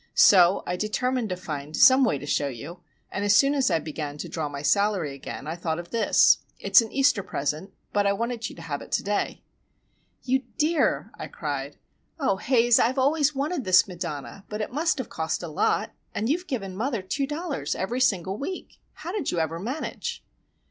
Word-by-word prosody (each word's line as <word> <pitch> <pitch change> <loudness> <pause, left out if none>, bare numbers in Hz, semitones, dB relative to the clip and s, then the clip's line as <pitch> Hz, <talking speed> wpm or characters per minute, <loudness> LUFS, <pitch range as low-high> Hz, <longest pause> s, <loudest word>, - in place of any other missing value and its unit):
So 185 -1 +6
I 180 - -2
determined 230 +3 -1
to 180 - -3
find 150 -4 -6
some 260 +1 +7
way 225 - +2
to 140 - -8
show 145 0 0
you, 140 +7 -8 0.3
and 200 - -3
as 205 0 +4
soon 275 +1 +5
as 270 -2 +2
I - - +3
began 150 -2 -5
to - - -5
draw 155 -3 -3
my 140 0 -6
salary 200 -5 +2
again 140 0 -8
I 160 +2 -4
thought 165 -2 -2
of 175 0 -8
this. 230 -2 +4 0.2
It's - - +5
an 225 - -6
Easter 275 -5 +3
present,—but 190 +6 -3
I - - +4
wanted 230 +2 -2
you - - -11
to 165 - -10
have 150 -3 -4
it - - -12
to - - +1
day." 205 +1 -2 0.8
"You 260 +1 +2 0.2
dear!" 315 +2 +1
I - - -5
cried. - - -5 0.4
"Oh, 265 -10 +1
Haze, 240 +1 +3
I've 255 +4 +2
always 290 +2 +2
wanted 290 +2 -1
this 185 -1 +5
Madonna. 175 0 -6
But 210 +1 -4
it 215 - -4
must 315 +3 +1
have 260 - -4
cost 160 +2 -3
a - - -4
lot,—and 210 +6 -2
you 315 +5 +2
have 365 - -16
given 195 -9 -4
mother 230 -1 -2
two 275 +9 -2
dollars 295 - -3
every 240 +7 -2
single 190 -3 +1
week! 370 +6 -6
How 345 - -7
did 385 -7 -2
you - - -2
ever 165 0 -1
manage?" 255 - -4
205 Hz, 200 wpm, -26 LUFS, 165-260 Hz, 0.8 s, some